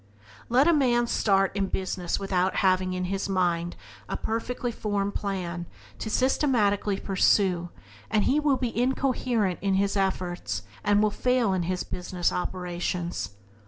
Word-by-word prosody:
Let 255 +6 +4
a 340 - +6
man 245 -5 +3
start 195 -4 +2
in 195 -1 0
business 185 -1 -2
without 190 -1 0
having 185 0 +2
in 185 0 -2
his 195 +2 -2
mind 175 -2 0 0.3
a - - -2
perfectly 240 +2 -2
formed 205 -3 -2
plan 180 -4 -3 0.3
to 220 - -4
systematically 215 -6 +2
pursue 185 -2 +2 0.4
and 215 -2 +2
he 290 - +3
will 295 -3 +2
be 245 -3 -3
incoherent 245 -5 +1
in 195 -1 +1
his 200 +1 +1
efforts 185 -2 -1 0.2
and 205 0 +3
will 215 - +3
fail 250 -3 +1
in 185 - 0
his 185 -1 -1
business 180 -1 -2
operations. 180 - -3
195 Hz, 145 wpm, -27 LUFS, 185-230 Hz, 0.4 s, a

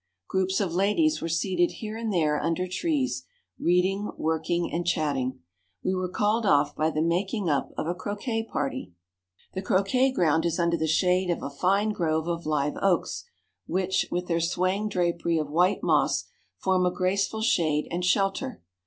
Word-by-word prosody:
Groups 190 0 0
of 190 -5 -1
ladies 210 - +2
were 165 - -3
seated 175 +1 +1
here 215 -1 -6
and 225 -1 -3
there 155 -5 +1
under 170 +2 -1
trees, 275 - -1 0.3
reading, 185 +4 +1
working, 160 +2 -1
and 175 - 0
chatting. 140 -7 -1 0.4
We 185 - +1
were 185 -1 -1
called 210 +5 +1
off 145 -6 +3
by 155 +1 +1
the 155 0 0
making 190 +4 0
up 145 - 0
of - - -1
a 170 - 0
croquet 215 +5 -3
party. 135 -10 -3 0.6
The 190 - -3
croquet 200 +8 +2
ground 160 - +2
is 170 -1 0
under 170 -1 +2
the 160 -1 -1
shade 180 +3 +2
of 175 - -1
a 140 - -4
fine 195 +8 +1
grove 160 -4 -1
of 170 -2 -3
live 150 -1 0
oaks, 195 -3 +1 0.4
which, 185 +1 0
with 180 +1 -2
their 170 -1 0
swaying 185 +5 0
drapery 170 -3 0
of 150 -2 -2
white 180 +5 +2
moss, - - +2 0.3
form 185 -1 +1
a - - +1
graceful 195 +4 0
shade 155 -8 +2
and 175 +1 -2
shelter. 195 - 0
180 Hz, 170 wpm, -27 LUFS, 165-195 Hz, 0.6 s, off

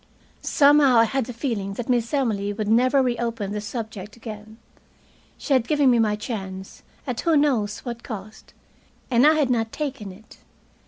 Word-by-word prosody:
Somehow 285 -4 +5
I 230 - +7
had 260 +2 -1
the - - -5
feeling 225 -5 -3
that 240 - -5
Miss 240 -2 0
Emily 220 -8 0
would 215 0 -4
never 255 +5 +3
reopen 235 -4 -2
the 210 0 -3
subject 210 -2 -7
again. 220 -1 -10 0.8
She 285 - -2
had 250 -3 +2
given 290 -4 +3
me 240 - +3
my 215 -2 +2
chance, 190 -4 -7 0.2
at 250 -3 -3
who 330 -3 +3
knows 235 -8 +1
what 235 -2 -6
cost, 215 -3 -9 0.6
and 245 +4 +5
I 310 - +6
had 290 -5 +1
not 225 -2 0
taken 275 -9 -5
it. 210 +4 -16
230 Hz, 170 wpm, -23 LUFS, 210-260 Hz, 0.8 s, I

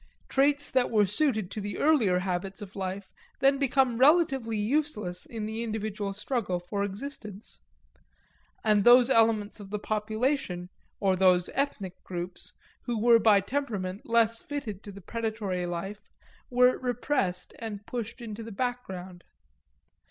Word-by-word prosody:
Traits 285 +1 +2
that 255 -1 +2
were 210 -2 +4
suited 215 - 0
to 215 - -4
the 205 +1 -4
earlier 250 -12 +3
habits 185 +1 -3
of 205 -1 -10
life 190 0 -4 0.3
then 275 +1 +4
became 265 -3 +2
relatively 270 -6 +4
useless 210 -6 -1
in 225 -2 -5
the 220 +1 -4
individual 215 -3 -3
struggle 205 -2 -2
for 200 +3 -3
existence. 210 - -7 1.0
And 210 -2 +3
those 245 +2 +7
elements 220 -3 +3
of 200 -2 -10
the 210 - -2
population, 215 -3 -1 0.3
or 190 -2 +2
those 180 -1 +3
ethnic 205 -10 -3
groups, 180 0 -6 0.4
which 240 -2 -1
were 230 +1 +6
by 210 -2 +5
temperament 200 -5 -3
less 230 0 +3
fitted 235 -9 -5
to 205 - -7
the 200 0 -11
predatory 215 -4 -3
life 195 +4 -5 0.5
were 250 0 +4
repressed 245 -7 -1
and 210 -3 -6
pushed 235 0 -5
into 225 -1 -6
the 225 0 -8
background. 190 -6 -4
215 Hz, 140 wpm, -28 LUFS, 195-245 Hz, 1.0 s, those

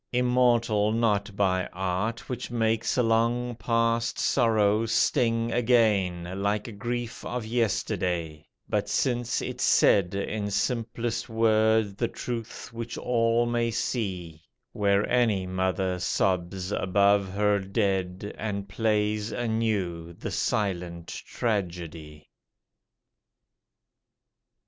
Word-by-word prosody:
Immortal 120 -4 +2
not 105 -3 +1
by 95 -2 +1
art 95 +5 -2
Which 125 -1 -5
makes 115 -1 0
a 125 - +4
long 120 +2 +1
past 115 0 0
sorrow 110 -1 +2
sting 115 -1 +2
again 100 -7 +1
Like 105 +1 -2
grief 120 +1 -4
of 125 -2 -4
yesterday: 90 -8 -1 0.2
but - - -1
since 120 -2 0
it - - -5
said 95 -1 +4
In 105 +1 -2
simplest 115 +1 -2
word 110 -2 +2
the 115 - +1
truth 115 -1 -6
which 115 0 -5
all 115 -1 +2
may 120 0 0
see, 95 -9 -3 0.3
Where 100 -2 +2
any 110 -6 +2
mother 95 0 -1
sobs 90 +1 -1
above 100 0 +2
her 105 0 +2
dead 95 -1 -1
And 100 -2 -3
plays 105 0 0
anew 105 -8 -2
the - - -6
silent 90 -4 -2
tragedy. 85 -8 -4
105 Hz, 100 wpm, -27 LUFS, 95-115 Hz, 0.3 s, a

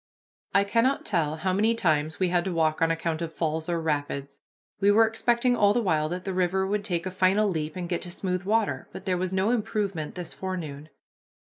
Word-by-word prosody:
I 200 - +6
cannot 230 +6 +1
tell 155 -6 0
how 185 +4 -1
many 220 +4 +2
times 155 -6 0
we 185 -2 +2
had 175 -1 +2
to 190 - -1
walk 160 -2 +1
on 165 - +4
account 165 0 -1
of 165 -1 -5
falls 160 0 -2
or 170 -1 0
rapids. 145 -3 -3 0.4
We 200 +1 +4
were 220 +2 +6
expecting 235 +2 +2
all 205 -3 +4
the 240 - +2
while 155 -5 +1
that 180 +2 -4
the 190 - -2
river 185 +1 +1
would 205 +1 -1
take 175 -4 -2
a 185 - -3
final 190 +3 +3
leap 155 -5 -2
and 180 -1 -4
get 175 -1 -2
to 180 - -5
smooth 180 0 -2
water, 215 +2 0
but - - -9
there 185 -2 +1
was 185 0 -2
no 190 +4 +1
improvement 205 -8 -2
this 175 -3 -4
forenoon. 155 -6 -5
185 Hz, 220 wpm, -26 LUFS, 160-200 Hz, 0.4 s, I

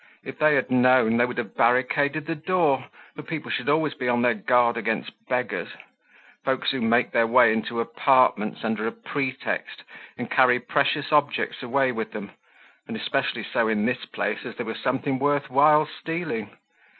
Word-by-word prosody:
If - - -9
they 155 -1 +4
had 135 - 0
known, 125 -2 +4
they 120 +1 +3
would 125 - -7
have 120 - -4
barricaded 140 +5 +1
the 165 - -2
door, 155 -5 0 0.3
for - - -7
people 150 0 -6
should - - -2
always 155 0 +1
be 125 - -4
on 120 0 +1
their 120 -1 +3
guard 120 +2 +2
against - - -2 0.2
beggars—folks 130 -1 -4
who 135 - -3
make 115 +2 +2
their 115 -1 +2
way 115 -1 +5
into 115 +1 -3
apartments 125 -2 +2
under 110 -1 -1
a - - -2
pretext 135 0 -4 0.3
and - - -5
carry 125 -1 +4
precious 145 +3 0
objects 145 -1 +1
away 130 +1 +1
with 115 -2 -5
them; 100 -1 -7 0.6
and - - -5
especially - - -2
so 115 - 0
in 110 -1 0
this 125 0 -2
place, 105 +1 -3
as - - -8
there 120 - -5
was 110 - -5
something 135 +1 -1
worth 145 -1 0
while 150 +3 +5
stealing. 155 -9 -5
125 Hz, 175 wpm, -24 LUFS, 115-145 Hz, 0.6 s, way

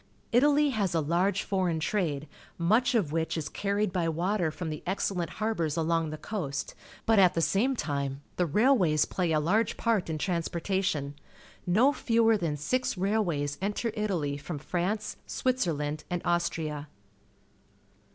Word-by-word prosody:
Italy 290 +4 +4
has 200 -7 0
a - - +3
large 175 +6 +1
foreign 185 -5 0
trade, 155 -5 -1 0.3
much 220 +9 +3
of 190 -11 +1
wliich 160 +1 -1
is 155 -1 -3
carried 200 -1 -1
by 170 -3 +1
water 175 +2 0
from 160 +1 -5
the 155 - -5
excellent 180 -2 -1
harbours 170 -8 -1
along 165 0 +1
the 155 - -5
coast, 150 -6 -4 0.3
but 225 -2 +4
at 185 -2 +5
the - - +1
same 235 +11 +2
time 140 - -3
the 180 - +1
railways 185 - +3
plaj' 170 -4 0
a - - +3
large 200 +9 +1
part 225 -7 +1
in 160 - -2
trans 170 0 -1
portation. 170 -5 -1 0.5
No 235 +11 +4
fewer 230 -3 +3
than 165 -7 -1
six 250 - -1
railways 175 -8 0
enter 210 +4 -1
Italy 175 -10 -1
from 150 +2 -6
France, 185 +8 -2
Switzerland, 155 - -1
and 175 -1 -2
Austria. 160 -4 -1
175 Hz, 150 wpm, -29 LUFS, 155-210 Hz, 0.5 s, at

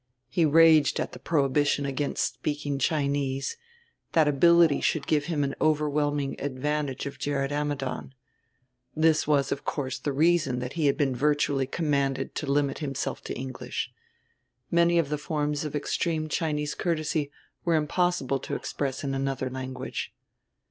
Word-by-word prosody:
He 160 +6 +2
raged 155 -1 +5
at - - -2
the - - -10
prohibition 145 -1 +1
against 140 -3 -1
speaking 145 +3 -3
Chinese; 140 - 0 0.6
that 160 -2 +4
ability 165 +1 +5
should 155 -3 0
give 150 -2 +1
him 160 -4 0
an 135 0 -1
overwhelming 145 -2 +1
advantage 145 0 -2
of 140 - -6
Gerrit 140 -1 -1
Ammidon. 145 -2 -3 0.8
This 155 -1 +3
was, 140 -2 +2
of 140 - -2
course, 135 -3 -3
the 145 - -2
reason 155 -2 +2
that 125 +1 -4
he 160 -3 +1
had 140 - +2
been 135 -3 +1
virtually 145 0 +1
commanded 140 -3 -1
to 145 -3 -2
limit 140 -1 +1
himself 135 -3 -3
to - - -4
English. 130 0 -5 0.8
Many 170 0 +4
of 165 -4 +2
the 150 -1 -2
forms 150 -1 -1
of 150 -1 -4
extreme 155 +2 -1
Chinese 150 -2 -1
courtesy 155 -3 -1 0.3
were 170 -2 +2
impossible 155 -3 +1
to - - -4
express 135 -2 -3
in 135 -1 -2
another 135 -1 -2
language. 130 0 -5
145 Hz, 150 wpm, -27 LUFS, 135-155 Hz, 0.8 s, raged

